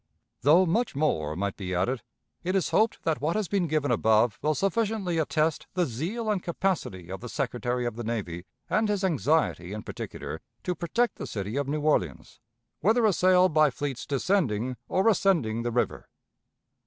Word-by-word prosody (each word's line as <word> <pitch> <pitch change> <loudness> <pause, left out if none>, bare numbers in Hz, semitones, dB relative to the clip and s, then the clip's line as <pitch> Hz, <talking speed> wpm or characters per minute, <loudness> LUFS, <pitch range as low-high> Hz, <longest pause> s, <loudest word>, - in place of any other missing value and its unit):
Though 165 +7 +6
much 215 - 0
more 80 - 0
might 100 +2 -2
be 90 -2 -3
added, 110 +8 0 0.4
it 185 +2 -1
is 190 - +1
hoped 220 +1 +2
that 160 -3 0
what 155 +5 0
has 215 -3 0
been 190 -2 0
given 150 -3 0
above 110 -1 +3
will 155 +1 +1
sufficiently 200 -3 0
attest 155 0 0
the 180 -1 +2
zeal 180 - -2
and 200 -3 0
capacity 170 - -2
of 95 - -6
the 125 - -7
Secretary 125 -2 -2
of 120 -2 -2
the 120 - -5
Navy, 100 -7 -4 0.2
and 215 0 +1
his 205 -1 0
anxiety, 155 - +1
in 105 - -5
particular, - - -6 0.2
to 180 - -1
protect 200 +9 0
the - - -5
city 105 +2 -4
of 140 -1 -1
New 150 +2 -1
Orleans, 90 - -1 0.4
whether 225 +3 +3
assailed 185 -2 +4
by 155 -1 +5
fleets 135 0 -4
descending 130 - 0
or 190 +4 +2
ascending 165 - +2
the 120 - -1
river. 120 +1 -1
150 Hz, 175 wpm, -27 LUFS, 115-185 Hz, 0.4 s, Though